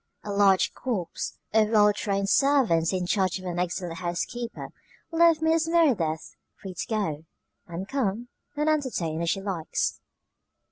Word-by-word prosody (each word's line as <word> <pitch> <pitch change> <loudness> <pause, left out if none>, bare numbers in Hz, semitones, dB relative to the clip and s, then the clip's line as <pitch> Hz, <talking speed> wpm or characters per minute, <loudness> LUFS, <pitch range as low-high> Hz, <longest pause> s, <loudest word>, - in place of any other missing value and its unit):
A 205 - -5
large 200 -2 +4
corps 205 -10 -3 0.2
of 215 -1 +4
well 210 -2 +5
trained 200 -1 -1
servants 230 - +3
in 185 -2 -1
charge 190 0 +1
of 185 - -10
an 175 -1 -3
excellent 175 -1 -3
housekeeper 230 +7 -4 0.4
left 330 -1 +4
Mrs. 320 0 +2
Merideth 245 - +1 0.2
free 190 -2 -7
to - - -5
go, 165 -9 -2 0.4
and 180 +2 -6
come, 240 -2 -2 0.3
and 300 +1 0
entertain 245 - 0
as 170 - 0
she 195 - 0
liked. 190 -5 -2
200 Hz, 145 wpm, -26 LUFS, 175-255 Hz, 0.4 s, well